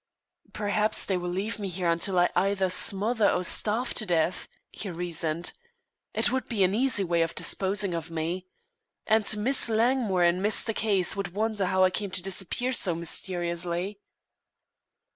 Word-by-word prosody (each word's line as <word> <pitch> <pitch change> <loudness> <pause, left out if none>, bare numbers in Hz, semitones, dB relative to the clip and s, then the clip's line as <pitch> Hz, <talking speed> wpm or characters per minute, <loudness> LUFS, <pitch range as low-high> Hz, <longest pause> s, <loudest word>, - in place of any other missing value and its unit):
"Perhaps 210 +1 +1
they 190 - 0
will 180 0 -3
leave 200 +5 -3
me 200 - -3
here 180 -1 -2
until 170 +3 +1
I 175 0 +3
either 195 -1 +1
smother 210 +4 +2
or 180 - 0
starve 220 +7 0
to 215 - -2
death," 170 0 0 0.2
he 205 - -6
reasoned. 170 -1 -2 0.6
"It - - +2
would 260 0 -2
be 210 -5 +1
an 185 +1 +2
easy 230 -2 +1
way 170 -2 +1
of 165 0 -1
disposing 195 -1 0
of 165 -1 -4
me. 165 +3 -4 0.6
And 215 -1 +2
Miss 240 +3 +3
Langmore 225 -4 +2
and 175 +2 +2
Mr. 220 +2 +2
Case 200 -5 +1
would 195 -2 -5
wonder 215 -2 0
how 185 +1 +2
I 185 - +4
came 200 +1 -3
to 180 - -4
disappear 195 +7 -1
so 180 -8 +2
mysteriously." 175 +2 -2
190 Hz, 160 wpm, -27 LUFS, 175-210 Hz, 0.6 s, I